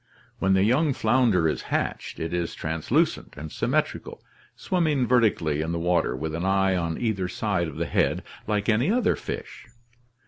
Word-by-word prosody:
When 95 0 +2
the 95 - +3
young 135 +7 +3
founder 110 -8 +3
is 75 - -1
hatched, - - -2
it 80 +1 -3
is 85 -1 -2
translucent 80 0 -1
and 75 +1 -7
symmetrical, - - -2 0.3
swimming 155 -8 +1
vertically 105 - +2
in 80 +2 -2
the - - -1
water 85 -5 +1
with 80 +4 -4
an 85 +2 -3
eye 95 0 +2
on 85 -2 -1
either 105 -6 -1
side 90 -1 -1
of 80 - -8
the - - -1
head - - +1 0.2
like 105 -1 0
any 115 - +2
other 245 +2 +2
fish. - - -7
95 Hz, 170 wpm, -25 LUFS, 80-115 Hz, 0.3 s, the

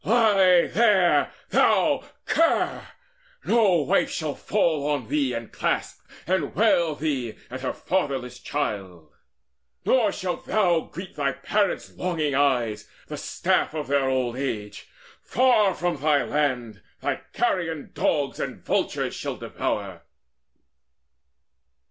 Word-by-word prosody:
Lie 195 -6 +5
there, 205 -6 +3 0.2
thou - - +3 0.2
cur! 330 0 +1 0.6
No 195 -9 +3
wife 195 +7 +2
shall 155 -4 -3
fall 160 -8 0
on 140 -7 -2
thee, 140 -4 +1
And 115 -1 -6
clasp, - - -2 0.2
and 185 +1 -1
wail 170 -8 +3
thee 135 -7 -2 0.2
and 130 +1 -6
her 130 - -1
fatherless 135 -9 -2
childs, 95 - -4 0.7
Nor 230 -6 +3
shalt 180 -3 -4
thou 185 -5 +3
greet 185 +3 -8
thy 140 -2 -1
parents' 200 +10 -1
longing 160 -5 -1
eyes, 120 -6 +1 0.2
The - - -5
staff - - 0
of 150 -1 -3
their 140 -1 +2
old 130 -2 0
age! 105 -7 -4 0.3
Far 220 -6 +3
from 175 -2 -1
thy 150 -2 +3
land 125 -9 -1 0.2
Thy - - -1 0.2
carrion 165 -5 -1
dogs 145 -3 0
and - - -5
vultures - - -1
shall - - -4
devour!" - - -4
150 Hz, 120 wpm, -25 LUFS, 130-185 Hz, 0.7 s, Lie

